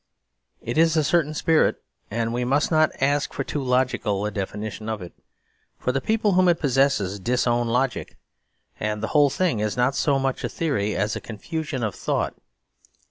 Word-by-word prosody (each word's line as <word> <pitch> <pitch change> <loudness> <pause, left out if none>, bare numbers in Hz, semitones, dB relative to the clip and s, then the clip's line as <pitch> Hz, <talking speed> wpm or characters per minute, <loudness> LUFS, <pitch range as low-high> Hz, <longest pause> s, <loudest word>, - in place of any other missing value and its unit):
It 120 +6 -1
is 165 0 +4
a 155 - +3
certain 155 0 +1
spirit; 160 0 +3 0.3
and 115 +2 -1
we 120 +1 -1
must 140 +6 +1
not 155 -1 +4
ask 140 +1 +1
for 135 - -2
too 145 - -3
logical 125 -6 0
a 105 - -2
definition 105 +2 -5
of 110 -1 -2
it, 90 -2 -9 0.6
for 125 - -1
the 135 +1 -1
people 215 +2 +1
whom 185 0 +4
it 170 - +2
possesses 135 - +1
disown 120 +2 +1
logic; 125 +2 -1 0.6
and 105 0 -2
the - - -1
whole 145 -2 +5
thing 170 - 0
is 105 +1 -1
not 125 +2 +2
so 140 0 +2
much 135 -1 -1
a - - -1
theory 120 -11 -1
as 105 +2 0
a - - -5
confusion 140 +4 -4
of 105 -4 -1
thought. - - -1
130 Hz, 185 wpm, -24 LUFS, 110-150 Hz, 0.6 s, whole